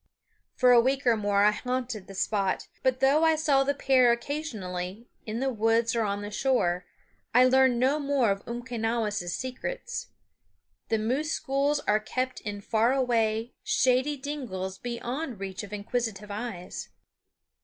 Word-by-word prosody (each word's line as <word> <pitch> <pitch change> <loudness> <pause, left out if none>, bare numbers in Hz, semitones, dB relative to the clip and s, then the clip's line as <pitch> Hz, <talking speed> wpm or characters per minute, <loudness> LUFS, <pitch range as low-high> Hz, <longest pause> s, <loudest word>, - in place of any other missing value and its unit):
For 250 -1 +5
a 240 -1 +8
week 270 +2 0
or 240 -2 +5
more 205 -1 +2
I 210 - +6
haunted 250 -3 -3
the 195 - -10
spot; 195 -1 0
but 260 -1 +1
though 280 +4 +4
I 320 -1 +5
saw 295 -3 +3
the 285 +1 0
pair 260 -3 +4
occasionally, 225 -7 -4 0.2
in 220 +3 -3
the 265 -1 0
woods 225 +1 +2
or 230 - +2
on 205 -1 -1
the 205 - -6
shore, 185 -8 +1 0.5
I 250 +1 +8
learned 260 -1 +4
no 270 +4 +2
more 275 -6 +2
of 195 0 -3
Umquenawis' 230 -5 -2
secrets. 480 - -4 0.8
The 225 - +2
moose 260 +9 -1
schools 285 0 0
are 210 +1 +2
kept 255 +4 -3
in 205 -1 -5
far 225 +3 +2
away, 230 -3 +1
shady 260 +3 +2
dingles 240 -10 -5
beyond 245 +1 -4
reach 190 -1 -5
of 205 -2 -9
inquisitive 210 -1 -3
eyes. 205 -4 -6
240 Hz, 155 wpm, -28 LUFS, 210-265 Hz, 0.8 s, a